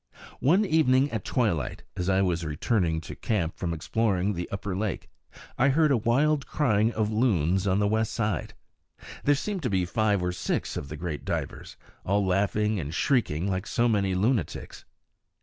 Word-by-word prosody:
One 180 Hz, +10 st, +3 dB
evening 145 Hz, -5 st, +3 dB
at 110 Hz, -2 st, -3 dB
twilight, 100 Hz, -, -1 dB
as 90 Hz, +1 st, -2 dB
I 95 Hz, 0 st, +3 dB
was 85 Hz, -2 st, 0 dB
returning 80 Hz, +1 st, 0 dB
to -, -, -8 dB
camp 90 Hz, -7 st, -1 dB
from 85 Hz, -, -3 dB
exploring 100 Hz, +3 st, 0 dB
the 90 Hz, -1 st, -5 dB
upper 100 Hz, -1 st, -4 dB
lake, 105 Hz, +1 st, -3 dB, 0.5 s
I 135 Hz, +2 st, +5 dB
heard 150 Hz, +2 st, +3 dB
a 135 Hz, -, +4 dB
wild 140 Hz, +6 st, +1 dB
crying 110 Hz, -6 st, +2 dB
of 110 Hz, -1 st, 0 dB
loons 95 Hz, -, +1 dB
on 95 Hz, 0 st, +2 dB
the 105 Hz, 0 st, +2 dB
west 110 Hz, +1 st, 0 dB
side. 105 Hz, -7 st, -2 dB, 0.7 s
There 145 Hz, -, +4 dB
seemed 195 Hz, +6 st, -3 dB
to 125 Hz, -, -1 dB
be 95 Hz, -3 st, +1 dB
five 100 Hz, +1 st, +1 dB
or 90 Hz, -, 0 dB
six 90 Hz, -, -2 dB
of 70 Hz, -, -5 dB
the 75 Hz, -, -6 dB
great 80 Hz, -2 st, -4 dB
divers, -, -, -4 dB, 0.3 s
all 100 Hz, +1 st, +1 dB
laughing 105 Hz, +3 st, +1 dB
and 75 Hz, -2 st, -4 dB
shrieking 95 Hz, -, +1 dB
like 95 Hz, +1 st, -2 dB
so 120 Hz, 0 st, +1 dB
many 100 Hz, -4 st, +1 dB
lunatics. 105 Hz, -, -1 dB
105 Hz, 175 wpm, -27 LUFS, 90-120 Hz, 0.7 s, I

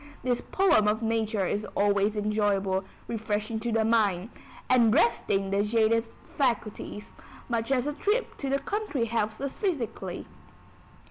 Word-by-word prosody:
This 245 Hz, -1 st, 0 dB
poem 360 Hz, -, +3 dB
of 215 Hz, +2 st, +1 dB
nature 220 Hz, -3 st, 0 dB
is 205 Hz, +3 st, -1 dB
always 205 Hz, +1 st, +2 dB
enjoyable, 205 Hz, -2 st, +1 dB, 0.2 s
refreshing 220 Hz, 0 st, -2 dB
the 225 Hz, -1 st, 0 dB
mind, 215 Hz, -2 st, +2 dB, 0.4 s
and 240 Hz, -3 st, +5 dB
resting 200 Hz, -4 st, +2 dB
the 200 Hz, +1 st, +2 dB
jaded 225 Hz, +1 st, +2 dB, 0.3 s
faculties, 230 Hz, -5 st, -2 dB, 0.3 s
much 230 Hz, +1 st, -1 dB
as 255 Hz, -1 st, +2 dB
a 295 Hz, -, -1 dB
trip 415 Hz, +11 st, -1 dB
to 275 Hz, -, -3 dB
the 275 Hz, -, +2 dB
country 290 Hz, -, -2 dB
helps 220 Hz, -1 st, -1 dB
us 275 Hz, -1 st, -3 dB
physically. 320 Hz, -, -3 dB
225 Hz, 135 wpm, -28 LUFS, 210-245 Hz, 0.4 s, and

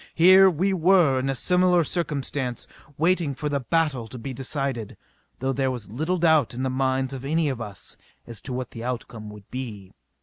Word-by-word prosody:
Here 185 Hz, +3 st, +7 dB
were 185 Hz, +3 st, 0 dB, 0.4 s
we 130 Hz, -, +1 dB
in 135 Hz, +1 st, -1 dB
a 135 Hz, -, 0 dB
similar 180 Hz, +3 st, +3 dB
circumstance, 140 Hz, -6 st, -2 dB, 0.3 s
waiting 165 Hz, -3 st, +1 dB
for 150 Hz, +2 st, -3 dB
the 140 Hz, -1 st, 0 dB
battle 140 Hz, -4 st, 0 dB
to 125 Hz, -, -9 dB
be 130 Hz, +3 st, -6 dB
decided. 135 Hz, -3 st, -3 dB, 0.4 s
Though 135 Hz, +1 st, -1 dB
there 135 Hz, 0 st, 0 dB
was 120 Hz, -6 st, -6 dB
little 160 Hz, +10 st, -1 dB
doubt 160 Hz, -8 st, +3 dB
in 130 Hz, -, -3 dB
the 130 Hz, -, 0 dB
minds 130 Hz, 0 st, 0 dB
of 135 Hz, -1 st, -6 dB
any 155 Hz, +2 st, +1 dB
of 130 Hz, -4 st, -4 dB
us 105 Hz, -4 st, -7 dB, 0.3 s
as 115 Hz, -3 st, -9 dB
to 130 Hz, -, -7 dB
what 125 Hz, -1 st, -4 dB
the 115 Hz, -, -8 dB
outcome 115 Hz, -3 st, -5 dB
would 105 Hz, -2 st, -12 dB
be. 110 Hz, -7 st, -7 dB
135 Hz, 195 wpm, -25 LUFS, 120-160 Hz, 0.4 s, Here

